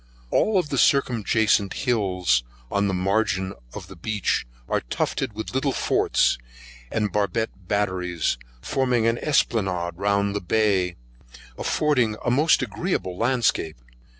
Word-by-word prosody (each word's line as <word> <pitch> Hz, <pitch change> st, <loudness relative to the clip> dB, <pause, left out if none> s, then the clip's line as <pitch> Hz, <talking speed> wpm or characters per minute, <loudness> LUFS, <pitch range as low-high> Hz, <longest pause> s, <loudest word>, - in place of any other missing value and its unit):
All 200 Hz, -4 st, +3 dB
the 140 Hz, -4 st, -2 dB
circumjacent 110 Hz, -6 st, +2 dB
hills 90 Hz, -, +2 dB, 0.3 s
on 100 Hz, 0 st, +1 dB
the 95 Hz, -, -1 dB
margin 95 Hz, 0 st, 0 dB, 0.2 s
of -, -, -7 dB
the -, -, -12 dB
beach 105 Hz, -, -1 dB, 0.2 s
are -, -, 0 dB
tufted 60 Hz, -, -2 dB
with 110 Hz, +3 st, -6 dB
little 135 Hz, +1 st, +1 dB
forts, -, -, +2 dB, 0.5 s
and 105 Hz, -2 st, 0 dB
barbett 105 Hz, -1 st, -2 dB
batteries, 90 Hz, -9 st, -1 dB, 0.2 s
forming 125 Hz, -4 st, +1 dB
an 115 Hz, +1 st, +2 dB
Esplanade 95 Hz, -, +1 dB
round 100 Hz, +1 st, +1 dB
the 105 Hz, -, -1 dB
bay, 95 Hz, -2 st, +1 dB, 0.6 s
affords 125 Hz, -, +1 dB
a 120 Hz, -, +2 dB
most 150 Hz, +6 st, +4 dB
agreeable 165 Hz, -, -2 dB
landscape. 115 Hz, -, +1 dB
105 Hz, 125 wpm, -24 LUFS, 95-120 Hz, 0.6 s, most